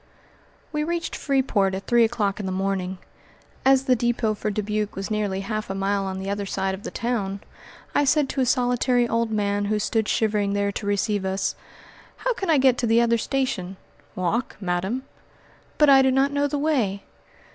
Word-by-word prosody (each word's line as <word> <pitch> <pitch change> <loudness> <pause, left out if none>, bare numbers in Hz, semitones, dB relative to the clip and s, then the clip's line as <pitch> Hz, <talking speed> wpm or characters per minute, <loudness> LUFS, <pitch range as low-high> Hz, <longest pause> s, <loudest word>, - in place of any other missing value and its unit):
We 300 -1 -1
reached 340 +1 -2
Freeport 230 -9 +1
at 195 - -6
three 240 -1 +4
o'clock 215 -3 0
in 200 - -3
the - - -2
morning. 190 -1 -2 0.7
As 265 0 +5
the 255 -1 +3
depot 235 -2 0
for 215 +1 -3
Dubuque 210 0 -2
was 195 +2 -5
nearly 205 -3 -1
half 215 +1 -4
a 195 - -3
mile 195 0 0
on 190 0 -4
the 190 +1 -5
other 200 0 -2
side 190 0 -1
of 190 - -6
the - - -5
town, 205 -5 -2 0.5
I - - +3
said 290 0 +3
to 270 - -1
a - - +3
solitary 245 -1 +2
old 230 0 0
man 205 -1 0
who 215 +1 0
stood 220 +1 0
shivering 210 -2 +1
there 200 0 0
to 200 - -5
receive 205 0 0
us, 190 +1 -1 0.6
"How - - 0
can 385 -5 -4
I 315 - +5
get 260 -2 +4
to 240 - 0
the 225 +1 +4
other 235 -1 +3
station?" 200 -9 -2 0.4
"Walk, 185 +7 -1
madam." 190 +7 -2 0.7
"But 300 - +5
I 270 -1 +8
do 265 - +4
not 270 +2 +2
know 285 0 +2
the 290 - -2
way." 250 -10 0
215 Hz, 195 wpm, -24 LUFS, 195-255 Hz, 0.7 s, I